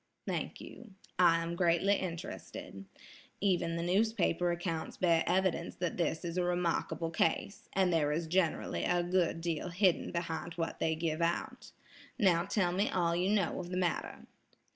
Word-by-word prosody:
"Thank - - -3
you; 225 -5 -12 0.2
I 165 -2 +5
am 170 +1 -3
greatly 175 +3 +3
interested. 170 - -5 0.5
Even 180 -4 +1
the 170 - -2
newspaper 180 -2 +2
accounts 170 -2 -3
bear 170 -3 +3
evidence 180 -2 +1
that 175 -1 -3
this 170 0 -1
is 170 +1 -2
a - - +2
remarkable 175 -1 -1
case, 165 +5 -1
and 190 -2 +2
there 150 -3 +2
is 165 +3 -1
generally 170 0 0
a 175 0 +2
good 175 -2 +1
deal 170 0 -2
hidden 180 0 +2
behind 170 -1 -3
what 165 -2 -3
they 160 0 +1
give 160 0 -2
out. 170 +1 -2 0.5
Now 180 -7 +3
tell 190 -3 +1
me 195 +4 +1
all 170 -2 +1
you 180 +2 +1
know 200 -5 +1
of 175 -1 -6
the 180 - -3
matter." 175 -3 -2
175 Hz, 165 wpm, -32 LUFS, 165-185 Hz, 0.5 s, I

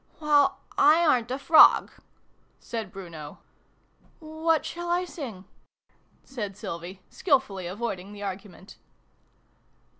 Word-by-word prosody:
" - - -31
Well, 295 -2 +2
/ - - -23
aren't 300 -6 +4
a 260 - -2
frog," 315 +3 +6 0.7
said 225 -5 -6
Bruno. 165 -6 -10 0.5
" - - -35
What 315 0 -1
shall 345 0 -6
I 355 +1 +1
sing? 235 - -8 0.4
" - - -39 0.3
said 210 -7 -6
Sylvie, 180 0 -8
skilfully 260 - 0
avoiding 195 -1 -5
the 205 0 -9
argument. 195 0 -8
230 Hz, 120 wpm, -26 LUFS, 190-305 Hz, 0.7 s, frog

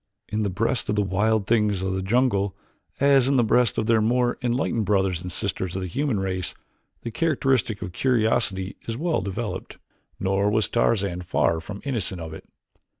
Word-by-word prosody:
In 110 - -1
the 105 - 0
breast 115 +6 -1
of 105 - +1
the 105 - +2
wild 105 +2 +1
things 105 -4 +1
of 95 0 -1
the 95 - -1
jungle, 100 -2 +1 0.4
as 140 -2 +5
in 140 - +2
the 125 - +4
breasts 115 0 +2
of - - +1
their 115 -1 +3
more 120 +2 +1
enlightened 120 -2 0
brothers 95 -4 +1
and 90 0 -6
sisters 95 0 -2
of 95 - -2
the - - -3
human 135 - -1
race, 95 -1 -3 0.5
the 115 - -4
characteristic 130 - +1
of 90 - -5
curiosity 110 -5 +1
is 115 0 -3
well 165 +3 0
developed. 95 0 -5 0.4
Nor 95 +1 +1
was 110 +1 +2
Tarzan 100 -6 +1
far 85 -2 +1
from 100 +4 -8
innocent 110 -9 -1
of 80 -1 -7
it. - - -11
105 Hz, 185 wpm, -24 LUFS, 95-120 Hz, 0.5 s, as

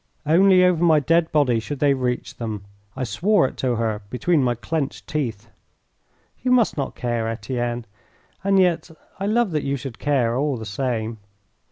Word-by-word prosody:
Only 185 +4 +5
over 175 -2 +2
my 160 -3 +5
dead 165 +3 +2
body 130 -6 +3
should 145 +6 -5
they 140 0 +3
reach 125 -2 -3
them. 110 -4 -5 0.3
I 130 - -3
swore 170 - +2
it - - -9
to 125 -2 0
her 110 -2 -1
between 150 +6 +1
my 125 -2 +1
clenched 140 +5 -3
teeth. 115 -7 -4 0.9
"You 255 - -1
must 250 -3 +3
not 140 -3 -3
care, 120 -2 -2
Etienne. 120 +1 -3 0.6
And 195 0 +3
yet 175 -2 +2 0.3
I 195 - -1
love 225 -1 +2
that 155 -2 0
you 140 0 -1
should 130 -2 -8
care 130 -6 +1
all 140 0 0
the 110 - -7
same." 110 0 -3
135 Hz, 175 wpm, -22 LUFS, 120-165 Hz, 0.9 s, Only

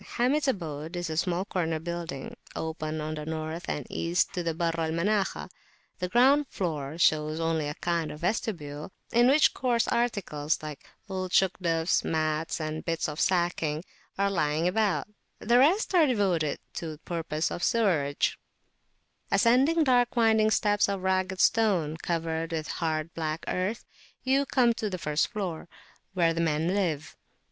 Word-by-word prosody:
Hamid's 280 +5 +2
abode 165 - -3
is 175 -2 -3
a 155 - -3
small 180 +2 0
corner 165 -5 -1
building, 170 -4 -5 0.2
open 155 -1 -3
on 155 +1 -3
the 150 -1 -5
North 160 +2 -4
and 145 - -3
East 170 +1 0
to 180 - -2
the 165 -2 -2
Barr 165 0 0
al 160 -1 0
Manakhah: 195 +5 0 0.5
the 180 - -2
ground 270 +6 +4
floor 155 -5 -3
shows 155 -1 +2
only 165 -2 0
a 145 - -4
kind 170 -2 -1
of 150 - -10
vestibule, 170 -6 -3 0.2
in 240 +1 +5
which 290 +4 +5
coarse 240 -3 +1
articles, 190 -11 0
like 150 -2 -8 0.2
old 185 -2 -3
Shugdufs, 170 -3 +2
mats 155 0 -1
and 155 0 -4
bits 165 -1 -1
of 150 0 -5
sacking, 170 -4 +1 0.3
are 200 0 +1
lying 155 -2 +1
about; 205 +1 +1 0.3
the 240 +2 +3
rest 360 - +3
are 335 -4 +5
devoted 185 - +1 0.2
to 160 -2 -5
purposes 165 -2 -2
of 175 - -4
sewerage. 165 -11 +1 0.9
Ascending 270 +8 +4
dark 245 -3 +3
winding 220 -2 +4
steps 205 -2 +2
of 195 -2 -3
ragged 190 0 0
stone 185 -10 +3
covered 165 -1 -2
with 155 -1 -2
hard 160 -1 -2
black 160 0 -3
earth, 190 +5 -2 0.4
you 270 +1 +2
come 245 -4 +3
to 225 -2 -3
the 185 - -3
first 150 -2 0
floor, 180 -6 -4 0.5
where 170 -2 +3
the 165 - -1
men 160 0 +1
live. 170 -6 -1
170 Hz, 155 wpm, -28 LUFS, 155-210 Hz, 0.9 s, in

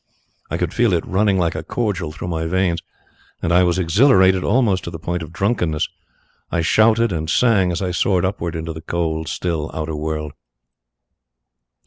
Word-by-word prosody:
I - - -2
could - - -2
feel 115 -5 +2
it 85 - 0
running 100 +1 +2
like 85 -2 +1
a - - -4
cordial 95 -9 -2
through 80 +3 -6
my 80 -1 -2
veins, 90 -1 0 0.6
and 85 - -1
I 90 - +6
was 90 0 +2
exhilarated 95 - +4
almost 105 -5 +2
to - - -4
the 85 - -7
point 85 +2 -3
of 80 0 -8
drunkenness. 85 -4 0 0.6
I 85 - 0
shouted 110 +6 +3
and 80 -2 -3
sang 100 -4 +3
as 85 +3 -2
I 90 - -1
soared 90 +1 +1
upwards 85 -3 -3
into 80 0 -4
the 80 - -8
cold, 80 -1 -2
still 80 -2 -2
outer 80 0 -3
world. 75 -1 -4
85 Hz, 175 wpm, -20 LUFS, 80-95 Hz, 0.6 s, I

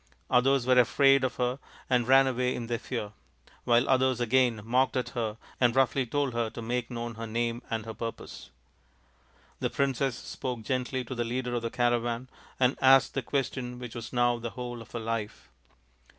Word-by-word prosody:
Others 130 +1 +3
were 125 0 +5
afraid 135 +3 +5
of 130 -2 -1
her 125 +1 -1 0.3
and 125 -2 +2
ran 135 +1 +7
away 125 -1 0
in 120 - -4
their 115 0 -2
fear, 110 -5 -4 0.5
while 120 +2 +4
others 130 -2 +2
again 120 -1 +2
mocked 130 +4 +1
at 125 - -1
her 110 -2 -3 0.2
and 120 -1 +3
roughly 135 0 +2
told 140 +1 -1
her 115 -1 0
to 115 - -9
make 120 +1 -2
known 120 -1 -5
her 115 +1 -6
name 115 +1 -1
and 110 -1 -2
her 110 - -6
purpose. 110 - -7 1.1
The - - 0
princess 135 -2 0
spoke 125 -3 -5
gently 130 +2 -2
to 125 - -6
the 120 -1 -1
leader 125 +1 -3
of 120 - -1
the 115 - -2
caravan 120 +1 0 0.3
and 130 +1 +2
asked 135 0 +6
the 135 - -1
question 125 -1 -3
which 125 -2 -8
was 115 -1 -7
now 120 -1 +2
the 115 0 -4
whole 120 0 -6
of 115 - -13
her 120 - -3
life. 110 -1 -4
120 Hz, 190 wpm, -28 LUFS, 115-130 Hz, 1.1 s, ran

